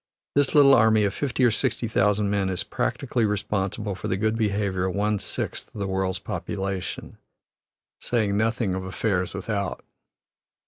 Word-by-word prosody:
This 145 0 +2
little 140 -2 +8
army 110 -3 +5
of 100 -1 +1
fifty 135 0 -1
or 120 - +5
sixty 115 +2 0
thousand 105 -1 +2
men 100 -2 +1
is 90 -2 -1
practically 120 - -1
responsible 105 0 -1
for 90 - -5
the 95 - 0
good 110 +2 +1
behavior 100 -4 0
of 95 - -3
one 105 0 +1
sixth - - -4
of - - -6
the 100 - -1
world's 95 -1 -1
population, 95 -2 -5 0.8
saying 110 -4 0
nothing 110 -2 +1
of 95 0 -3
affairs 95 0 -1
without. - - -3
105 Hz, 155 wpm, -25 LUFS, 95-110 Hz, 0.8 s, little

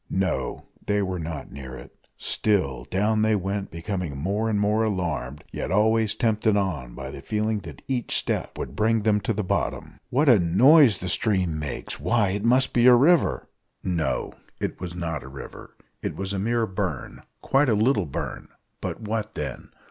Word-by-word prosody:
No, 95 -8 -1 0.2
they 105 0 +2
were 95 -1 -3
not 80 -2 -6
near 65 -2 -8
it; - - -13 0.2
still 70 - 0
down 105 +5 +1
they 110 0 +3
went, 100 +1 -2
becoming 85 -3 -4
more 100 +9 -1
and 105 -2 +1
more 105 +2 +2
alarmed, 80 - -2
yet - - -4
always 110 +1 +3
tempted 110 -2 +2
on 75 -12 -2
by - - -6
the - - -8
feeling 110 0 -1
that - - -11
each 125 -3 -1
step - - -2
would - - -5
bring 110 0 +2
them 105 -1 +3
to 100 - -1
the 105 -1 -1
bottom. 90 - -2
"What 145 +5 +2
a 120 -6 +7
noise 120 - +6
the 90 - -5
stream 90 -5 +1
makes! 75 -1 -5
why, 115 -4 +2
it 100 +2 -2
must 130 +3 +3
be 120 0 +5
a 125 - +9
river!" 155 +7 +3 0.4
No, 85 -4 -1 0.3
it - - -3
was 85 -1 -6
not 80 -3 -3
a 65 - -10
river 70 0 -10 0.3
it - - -3
was 95 +1 -3
a 100 - -1
mere 115 +3 +1
burn; 90 - -4 0.2
quite 135 0 +3
a 110 - +3
little 110 - +2
burn, 70 - -5 0.3
but - - -4
what 110 0 -3
then? - - -5
105 Hz, 185 wpm, -25 LUFS, 90-110 Hz, 0.4 s, a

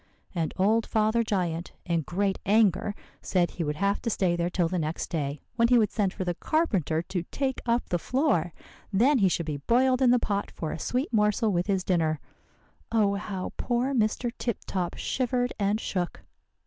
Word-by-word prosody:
And 165 -4 -1
old 220 +4 +2
Father 220 +1 +2
Giant, 180 -6 -2
in 170 -2 +1
great 195 +5 -1
anger, 205 -1 +3 0.3
said 175 -2 +1
he 170 - -3
would 150 -1 -2
have 200 +5 0
to 230 - -1
stay 185 -5 +1
there 175 0 0
till 175 -1 +1
the 180 +1 -1
next 155 +1 -3
day, 145 -3 -2 0.2
when 230 0 +5
he 245 0 +5
would 215 -3 +3
send 200 -4 +1
for 185 - -4
the 175 -1 -1
carpenter 180 - 0
to 180 0 -3
take 270 -2 -2
up 235 +1 +1
the 175 - 0
floor. 250 - +1 0.4
Then 250 +8 +4
he 195 -3 +4
should 170 -1 -1
be 150 -2 -3
boiled 255 - +2
in 255 - +5
the 250 - +6
pot 205 -4 -1
for 160 - -5
a - - -5
sweet 255 +2 -2
morsel 210 +1 +2
with 175 0 0
his 195 -3 +1
dinner. 160 -5 +1 0.7
Oh, 210 -3 +3
how 200 -2 -4
poor 250 +3 0
Mr. 235 0 +1
Tip 235 -4 -1
Top 180 -3 -2
shivered 250 -1 -1
and 205 +1 +1
shook! 180 -5 -3
200 Hz, 195 wpm, -27 LUFS, 175-235 Hz, 0.7 s, the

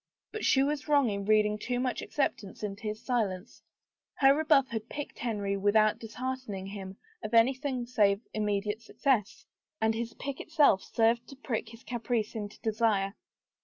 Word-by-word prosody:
But 435 - -5
she 270 - +4
was 290 +1 -1
wrong 285 -6 +4
in 200 0 -3
reading 210 0 +3
too 245 +2 -2
much 255 0 -1
acceptance 220 -8 -2
into 205 +1 -4
his 215 +1 -4
silence. 215 -5 -2 0.5
Her 275 -1 +6
rebuff 295 -4 +3
had 225 0 -5
piqued 290 -1 -6
Henry 205 -4 -1
without 210 +2 +3
disheartening 235 -3 -5
him 195 -1 -7 0.3
of 215 - -2
anything 255 +2 +2
save 205 -5 +3
immediate 210 0 -1
success. 230 -2 0 0.3
And 220 0 +2
his 230 0 -4
pique 280 -1 -5
itself 300 -12 +4
served 230 +1 +1
to 275 - -11
prick 235 -5 -3
his 230 +1 -14
caprice 235 -2 -2
into 210 -2 -6
desire. 215 -3 +1
225 Hz, 160 wpm, -30 LUFS, 210-260 Hz, 0.5 s, Her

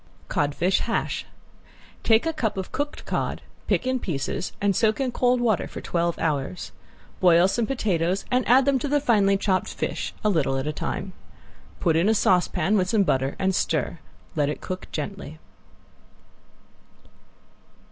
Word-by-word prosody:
~CODFISH 155 +6 +1
HASH~ - - -2 0.8
Take 225 +3 +3
a 325 - 0
cup 220 -8 -2
of 190 - -4
cooked 290 +1 -4
cod, - - -2 0.2
pick - - +1
in 255 0 0
pieces 165 - -3
and 200 -1 +1
soak 220 +4 +2
in 265 -2 0
cold 250 +1 +2
water 225 -5 +1
for - - -8
twelve 170 -1 -1
hours. 150 +2 -2 0.5
Boil 175 -1 +6
some 225 +3 0
potatoes 190 -7 0
and 250 0 +3
add 255 +2 +6
them 275 -2 +3
to 270 - -2
the 290 +1 +2
finely 205 -7 +3
chopped 190 -2 0
fish, - - -3
a 215 - +3
little 150 -8 +1
at 135 - -2
a 150 - -2
time. 185 +5 -4 0.7
Put 165 -3 +2
in 170 +6 +3
a 220 - +3
saucepan 190 +2 +2
with 185 -1 +1
some 210 -1 +3
butter 135 -5 0
and 190 0 +1
stir. 160 -1 -1 0.4
Let 145 -2 +1
it 150 - -4
cook 185 0 -6
gently. 155 -1 -5
190 Hz, 160 wpm, -25 LUFS, 165-230 Hz, 0.8 s, Boil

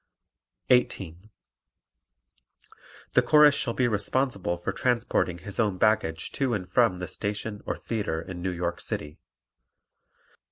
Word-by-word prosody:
18. 95 -6 +1 1.8
The - - +5
Chorus 150 -1 +6
shall 120 -4 -2
be 130 - +2
responsible 105 -3 0
for 85 - -3
transporting 115 -8 0
his 95 +5 -6
own 105 -5 +1
baggage 90 -7 +1
to 130 -4 0
and 90 -3 -4
from 115 -6 +3
the 90 0 -5
station 105 0 -4
or - - -2
theatre 105 -8 -3
in 90 +1 -7
New 95 - -1
York 85 0 -3
City. 75 0 -5
100 Hz, 125 wpm, -27 LUFS, 90-120 Hz, 1.8 s, Chorus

